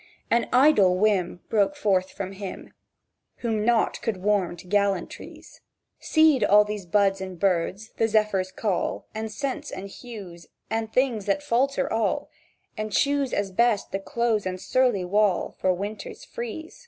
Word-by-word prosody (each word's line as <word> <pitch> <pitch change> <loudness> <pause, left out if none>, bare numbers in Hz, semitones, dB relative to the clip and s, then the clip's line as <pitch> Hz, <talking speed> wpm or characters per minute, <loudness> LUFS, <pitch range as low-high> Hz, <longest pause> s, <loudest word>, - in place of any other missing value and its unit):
"An 235 0 +2
idle 245 -9 +5
whim!" 185 -4 +1
Broke 215 +6 +2
forth 190 -9 +1
from 195 -1 -6
him 195 -1 -8 0.7
Whom 220 -3 -1
nought 235 0 +2
could 225 -4 -2
warm 190 -2 0
to 170 - -12
gallantries: 200 -1 -2 0.4
"Cede 315 -4 +4
all 210 +1 +6
these 210 -3 -6
buds 195 +1 +2
and 185 -2 -7
birds, 195 +3 0
the 225 - +2
zephyr's 210 -4 +1
call, 195 -1 -2
And 220 0 -4
scents, 270 +5 -4
and 195 - -6
hues, 195 -7 -10 0.2
and 220 0 -2
things 240 -6 +1
that 205 +9 +1
falter 270 +1 +1
all, 225 0 -1 0.4
And 215 -1 -4
choose 280 +2 +1
as 200 -1 -1
best 230 0 +1
the 195 - -2
close 220 0 -1
and 185 0 -4
surly 205 0 +1
wall, 205 0 +1
For 185 - +2
winters 200 +4 -5
freeze." 240 - -7
210 Hz, 155 wpm, -25 LUFS, 190-235 Hz, 0.7 s, all